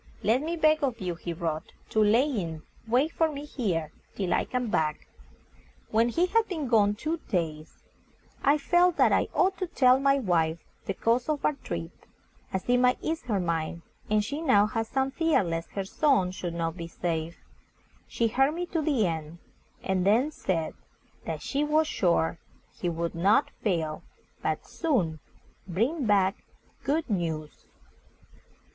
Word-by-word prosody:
"Let 230 +5 +3
me 325 +3 -2
beg 310 -1 +3
of 255 -4 0
you," 180 -2 -2
he 170 +1 -6
wrote, 160 -2 -4 0.2
"to 220 - +4
lie 215 +4 +5
in 175 - -3 0.2
wait 260 +8 +2
for 325 -1 +1
me 290 0 -6
here 180 - -2 0.2
till 190 -3 -1
I - - +1
come 250 -3 -2
back." 155 -1 0 0.9
When 230 +2 +3
he 335 +9 +2
had 450 +4 +2
been 315 -7 -3
gone 210 -3 +4
two 310 +9 -2
days, 160 -5 -3 0.6
I 285 +2 +5
felt 350 +4 +3
that - - +5
I - - +3
ought 375 +1 +1
to 370 - -1
tell 260 -6 +4
my 275 0 +3
wife 170 -9 +1 0.3
the 195 - -1
cause 240 +4 +1
of 300 -2 -1
our - - +3
trip, 85 - -6 0.6
as 190 -1 -3
it 245 0 +4
might 250 0 +4
ease 320 0 -1
her 215 -5 0
mind, 170 -1 -2 0.3
and 210 0 +2
she 285 +7 -4
now 210 -10 +5
had 225 +1 -2
some 265 +3 0
fear 325 -5 +2
lest 165 -1 -3
her 195 -1 -2
son 200 -4 +2
should 175 -2 -5
not 165 -1 -2
be 170 -2 -6
safe. 165 -1 -3 0.7
She 230 - 0
heard 270 +6 +2
me 355 +1 -2
to 325 - +1
the 280 -8 +2
end, 160 -1 -3 0.5
and 190 -1 0
then 230 +10 +3
said 170 - -2 0.5
that - - -4
she 285 +1 0
was 305 +1 +3
sure 170 - +1 0.4
he 175 - -2
would 170 0 -2
not 190 +6 +3
fail, 165 -7 -1 0.4
but - - -2
soon 190 - 0 0.5
bring 235 - 0
back 195 -2 +2 0.4
good 310 +3 0
news. 160 -7 -3
215 Hz, 170 wpm, -28 LUFS, 170-285 Hz, 0.9 s, lie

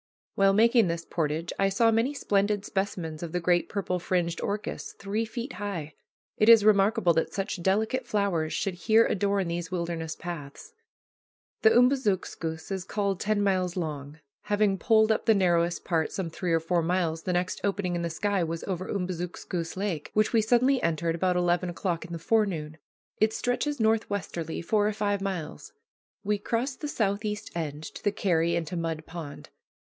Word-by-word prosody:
While 195 0 +4
making 230 0 +5
this 170 0 -3
portage 160 0 -2
I 195 0 +3
saw 225 +4 +3
many 230 +6 +1
splendid 205 -4 +1
specimens 180 -7 -3
of 170 -1 -6
the 180 - +1
great 175 0 +1
purple 180 -3 -2
fringed 175 -1 -1
orchis, 210 +1 -4
three 205 +3 -2
feet 240 +3 -6
high. 170 -7 -4 0.4
It 215 - +4
is 225 -3 +8
remarkable 200 -4 +4
that 165 - 0
such 195 -2 -3
delicate 220 +7 0
flowers 195 -8 0
should 195 - -1
here 220 +6 +4
adorn 200 -1 0
these 170 0 -3
wilderness 170 -3 -3
paths. 170 - -8 0.9
The 445 - +7
Umbazookskus 205 - +1
is 190 -2 -2
called 200 -1 -1
ten 210 -1 +1
miles 185 -2 0
long. 150 -3 -4 0.3
Having 205 -2 +2
poled 220 -1 +4
up 220 - -1
the 225 - +6
narrowest 175 -3 +1
part 160 -3 0
some 180 -4 -4
three 175 +1 -3
or 165 - +4
four 170 +2 0
miles, 165 -1 0
the 180 - -2
next 180 +1 -1
opening 195 -3 -1
in 170 - -1
the 170 - -2
sky 195 +3 0
was 165 0 -4
over 185 -1 -4
Umbazookskus 180 -2 -4
Lake, 185 -7 -2
which 215 +2 +2
we 225 - +5
suddenly 250 +4 +3
entered 165 0 0
about 180 +2 +1
eleven 175 0 +1
o'clock 175 -1 -2
in 170 - -11
the 170 - -3
forenoon. 165 -5 0 0.4
It 215 +1 +3
stretches 270 +3 -1
north 220 0 +2
westerly 170 -5 -4
four 210 +3 +2
or 215 - 0
five 205 -1 -1
miles. 180 - -5 0.5
We 205 0 0
crossed 240 +5 -2
the 300 - -2
southeast 210 -4 -2
end 155 -3 -4
to - - -9
the 205 - +2
carry 170 -4 +1
into 170 +1 -3
Mud 165 -2 -3
Pond. 160 -4 -8
185 Hz, 175 wpm, -27 LUFS, 170-210 Hz, 0.9 s, is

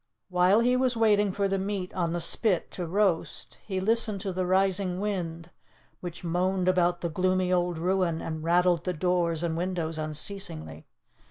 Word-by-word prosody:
While 180 +4 +4
he 250 +1 +3
was 255 -2 +1
waiting 210 -3 +3
for 200 +1 0
the 195 0 -1
meat 195 -1 -3
on 170 -3 -1
the 175 - -1
spit 180 +2 0
to 175 -2 -4
roast, 190 -1 -1
he 190 -2 -3
listened 215 0 +1
to 190 -1 -3
the 185 0 -1
rising 190 -1 +1
wind, 175 -5 -4 0.5
which 175 -1 -7
moaned 180 +2 0
about 175 -1 +2
the 170 - -1
gloomy 185 +2 +1
old 175 -1 +1
ruin, 180 -1 0
and 160 -1 -5
rattled 175 0 +3
the 180 - -1
doors 175 -1 0
and 165 -1 -1
windows 170 -2 -2
unceasingly. 150 - -3
180 Hz, 170 wpm, -27 LUFS, 170-195 Hz, 0.5 s, While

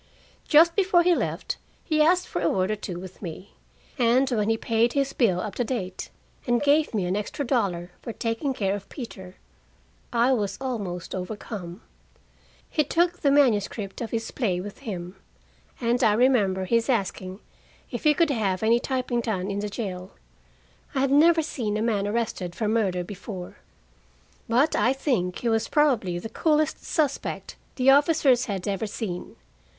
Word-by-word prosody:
Just 335 +2 +6
before 370 -3 +4
he 355 0 +4
left, - - -2 0.3
he 310 -2 +1
asked 355 +4 +3
for - - -3
a 170 - +2
word 185 +2 +1
or - - 0
two 190 -4 -6
with 185 0 -11
me, 185 +1 -8 0.5
and 245 +3 +4
when 215 -3 +1
he 225 - +2
paid 230 +1 +1
his 275 -1 0
bill 195 -8 +2
up 205 +1 -4
to 245 - -1
date, 205 -7 -4 0.4
and 240 0 +3
gave 290 -2 +3
me 195 -4 0
an 180 +2 0
extra 210 +7 -3
dollar 190 -9 -1
for 230 - -5
taking 230 +5 -2
care 200 -6 -1
of 200 -1 -9
Peter, 190 -8 -8 0.8
I 240 +2 +3
was 205 -5 -1
almost 205 -10 -4
overcome. 185 -1 -6 0.8
He 305 - +1
took 345 +4 +1
the 285 - +2
manuscript 215 -7 +1
of 230 - -3
his 225 -1 -3
play 195 -9 -1
with 200 +2 -8
him, 185 -7 -6 0.6
and 240 +1 +1
I 210 - +5
remember 210 -6 +3
his 230 +5 +1
asking 190 -4 -1 0.5
if - - -5
he 300 -1 +5
could 330 0 +3
have 205 -6 0
any 230 +2 +4
typing 250 -2 -1
done 200 -4 -2
in 200 - -2
the 210 0 -3
jail. 190 -3 -5 0.8
I 265 - +2
had 275 0 +1
never 320 +3 +5
seen 220 -8 -2
a - - -1
man 205 -3 0
arrested 205 -5 -2
for 220 - -1
murder 200 -5 +1
before, 190 -1 -8 0.9
but 260 +7 +3
I 255 - +3
think 240 - -1
he 235 - -1
was 225 0 +1
probably 245 - +2
the 175 - -5
coolest 305 +5 +1
suspect 295 -4 -2 0.2
the 265 +1 +5
officers 280 -3 +4
had 195 -6 -4
ever 200 +2 -1
seen. 195 -4 -5
225 Hz, 170 wpm, -25 LUFS, 195-270 Hz, 0.9 s, Just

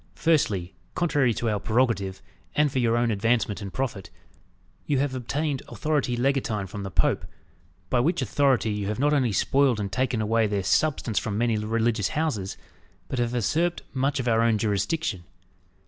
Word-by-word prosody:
Firstly, 100 - +1 0.2
contrary 145 -8 +2
to 120 - -2
our 105 -2 0
prerogative, 110 -5 0 0.3
and 150 -1 +3
for 130 - 0
your 115 -1 +2
own 120 -1 +2
advancement 110 0 0
and 100 -1 -6
profit, 115 -7 -3 0.8
you 145 - +2
have 135 0 0
obtained 135 +3 -2
authority 145 -6 -1
legatine 125 -6 0
from 100 +2 -7
the 95 - -4
Pope; 80 -4 +1 0.7
by 125 - +3
which 165 +8 +1
authority 135 -6 +2
you 105 -1 -2
have 105 - -2
not 145 +3 +2
only 130 -6 +2
spoiled 135 +2 +2
and 100 -2 -3
taken 130 -1 0
away 110 +1 +2
their 100 -2 -1
substance 130 -3 +1
from 105 -2 -3
many 115 0 +2
religious 110 -1 0
houses, 115 -12 -1 0.5
but 130 - -2
have 120 0 0
usurped 165 +9 0
much 135 +1 0
of 125 - -2
our 115 -1 +3
own 115 -1 +3
jurisdiction. 105 - -1
120 Hz, 170 wpm, -26 LUFS, 105-135 Hz, 0.8 s, and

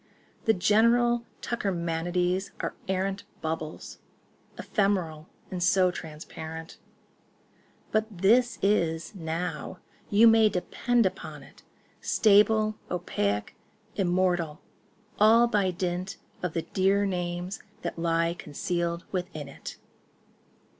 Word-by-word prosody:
The 225 - +5
general 235 +4 +3 0.2
tuckermanities 180 -2 -1
are - - -2 0.2
arrant 195 +1 -1 0.2
Bubbles—ephemeral 160 +2 -4 0.2
and 180 -1 -3
so 185 0 +4
transparent— 160 0 -8 1.1
But 215 0 +1
this 225 +6 +3
is, 170 -5 +1
now,—you 180 +5 0
may 225 -1 +6
depend 230 +5 +1
upon 190 - -4
it— - - -17 0.4
Stable, 215 +1 +4
opaque, 105 - -1 0.4
immortal—all 185 +5 +1
by 205 -5 +2
dint 180 +2 -3 0.2
Of 180 -3 -2
the 165 - -1
dear 195 +2 +2
names 180 0 -3 0.2
that 170 -1 -4
lie 165 0 +1
concealed 170 +2 -3
within 175 -6 -4
't. 140 - -9
185 Hz, 90 wpm, -28 LUFS, 170-210 Hz, 1.1 s, may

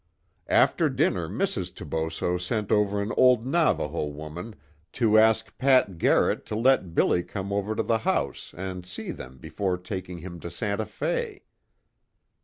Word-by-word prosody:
"After - - +3
dinner - - 0
Mrs. - - -2
Toboso 80 +2 -2
sent 105 +3 -2
over 105 -1 +2
an 105 - -3
old 125 -2 +5
Navajo 130 - +1
woman 75 +8 -7 0.4
to 110 -3 +4
ask 110 0 +3
Pat 130 -10 +3
Garrett - - +3
to - - -3
let 115 -7 +2
'Billy' 90 - +3
come 100 +2 -5
over 100 +2 -1
to 115 - 0
the 110 +1 +1
house - - -1
and 95 0 -5
see 90 - -6
them 65 +1 -10
before 95 +7 -2
taking 90 -1 -6
him 85 0 -8
to 85 - -6
Santa 100 +5 -2
Fe. - - -3
100 Hz, 150 wpm, -26 LUFS, 85-110 Hz, 0.4 s, old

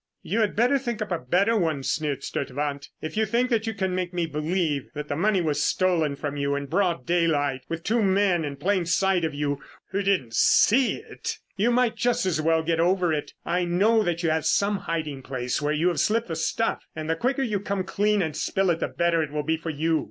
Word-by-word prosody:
"You - - -1
had 210 - 0
better 250 +5 +3
think 240 -4 -4
up 210 - -10
a 170 - 0
better 185 - +2
one," 160 -9 0
sneered 145 -2 -1
Sturtevant. 140 +1 -3
"If 155 - -5
you 220 0 +2
think 240 +4 +1
that 225 -1 +1
you 225 - -2
can 190 -2 -1
make 180 -1 -3
me 175 -1 +1
believe 155 -1 -1
that 150 0 -5
that 145 - -1
money 195 +3 +2
was 145 -3 0
stolen 170 -6 +1
from 145 0 -4
you 140 0 0
in 140 0 -3
broad 175 +2 0
daylight 155 -6 +1
with 165 0 -4
two 230 +4 +1
men 190 -3 +2
in 145 -2 -4
plain 180 +4 0
sight 190 0 +2
of 155 -2 -1
you 145 -1 -1 0.3
who 200 - 0
didn't 190 - 0
see 240 - +4
it, - - -6 0.2
you 210 +4 +2
might 245 -1 +2
just 245 -5 +1
as 165 -4 0
well 160 0 +2
get 165 0 0
over 175 -1 +2
it. 150 - -3
I 180 +1 0
know 200 +6 +3
that 175 -3 -1
you 165 - +2
have 160 0 0
some 200 0 +2
hiding 155 -5 -2
place 130 +1 -3
where 145 0 0
you 155 +4 +2
have 175 - -1
slipped 225 -1 +1
the 165 - -2
stuff 225 +7 -1
and 155 -1 -5
the 165 - +1
quicker 265 +9 0
you 210 -5 -1
come 200 -1 -2
clean 205 +1 +1
and 155 -3 -3
spill 190 +2 +1
it, 165 - -1
the - - -1
better 170 -1 +1
it 155 - -2
will 150 0 -2
be 160 +2 +1
for 165 +1 -6
you. 160 +1 +1
170 Hz, 235 wpm, -25 LUFS, 150-200 Hz, 0.3 s, see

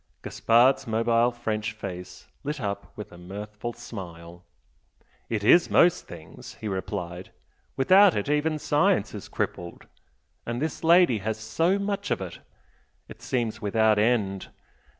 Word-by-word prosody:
Gaspard's 120 +3 +3
mobile 115 +1 +2
French 110 -3 -3
face 90 -3 -8 0.2
lit 150 +1 -3
up 100 -3 -4
with 105 - -8
a 85 - -13
mirthful 105 +5 -7
smile. 85 -7 -10 0.9
"It 110 -3 -2
is 170 +11 +5
most 175 0 +3
things!" 85 +11 -11
he 110 - -7
replied 95 -2 -5 0.5
"Without 185 +7 +6
it 105 - -2
even 150 +2 +1
science - - +1
is - - -8
crippled. 85 0 -4 0.6
And 120 +1 -4
this 155 +4 -3
lady 170 -8 +5
has 110 +2 -3
so 165 - 0
much 200 0 -3
of - - 0
it! 95 -3 -7 0.7
it - - -13
seems 120 -4 -2
without 110 +1 +2
end! 105 -4 0
110 Hz, 135 wpm, -26 LUFS, 100-130 Hz, 0.9 s, Without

